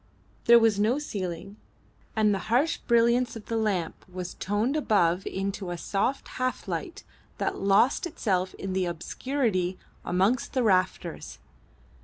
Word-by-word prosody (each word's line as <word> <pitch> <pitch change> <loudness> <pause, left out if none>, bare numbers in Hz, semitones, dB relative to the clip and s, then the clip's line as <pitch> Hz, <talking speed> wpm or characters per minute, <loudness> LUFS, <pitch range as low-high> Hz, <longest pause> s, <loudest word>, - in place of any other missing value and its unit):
There 235 -1 +8
was 225 -3 +3
no 220 +6 +2
ceiling, 195 - -5 0.6
and 215 -2 +3
the 195 - -1
harsh 270 +8 +2
brilliance 235 +1 +2
of 225 - -9
the 230 - -3
lamp 200 -7 -1
was 180 -1 -6
toned 210 +8 -1
above 195 - +2
into 195 -1 -3
a 175 - -3
soft 205 +10 -1
half 255 0 -3
light - - -4 0.3
that - - -2
lost 200 - +3
itself 190 - -1
in 190 -1 -5
the 185 -1 +1
obscurity 185 - -1 0.3
amongst 195 +8 +1
the 255 - +1
rafters. 185 - 0
205 Hz, 140 wpm, -27 LUFS, 185-235 Hz, 0.6 s, There